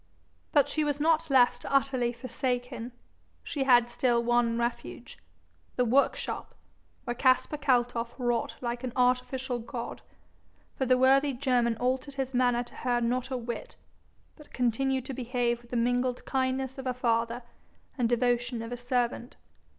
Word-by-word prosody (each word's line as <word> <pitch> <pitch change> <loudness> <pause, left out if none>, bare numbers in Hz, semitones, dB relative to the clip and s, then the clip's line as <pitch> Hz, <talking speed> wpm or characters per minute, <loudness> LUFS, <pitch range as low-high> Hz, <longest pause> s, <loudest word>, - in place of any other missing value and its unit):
But 290 -2 +4
she 310 - 0
was 290 -1 -1
not 320 +1 +2
left 245 -2 +4
utterly 270 -3 +1
forsaken; 245 0 -3 0.5
she 275 -3 -2
had 245 -2 +6
still 240 -1 +1
one 240 -1 +2
refuge 235 0 -4 0.6
the 250 - +2
workshop, 265 +4 0 0.5
where 240 - -2
Caspar 255 +4 +2
Kaltoff 245 -4 +1
wrought 240 -2 -1
like 240 0 -3
an 250 -2 -4
'artificial 250 0 +1
god;' 235 +1 -6 0.7
for 265 - -1
the 255 0 +4
worthy 270 +2 +4
German 245 -3 +1
altered 260 +3 -1
his 265 -1 -3
manner 245 -1 +2
to 240 - -16
her 245 -1 0
not 245 +2 -1
a 260 - -2
whit, 235 0 -6 0.6
but 300 - -16
continued 260 +2 0
to 265 - -5
behave 240 -1 -1
with 240 - -20
the 245 - -2
mingled 245 +1 0
kindness 265 0 -1
of 265 - -5
a 250 - -1
father 235 0 0 0.5
and 240 -4 +1
devotion 240 -1 0
of 230 - -7
a 245 - -4
servant. 245 0 -2
250 Hz, 150 wpm, -29 LUFS, 240-265 Hz, 0.7 s, had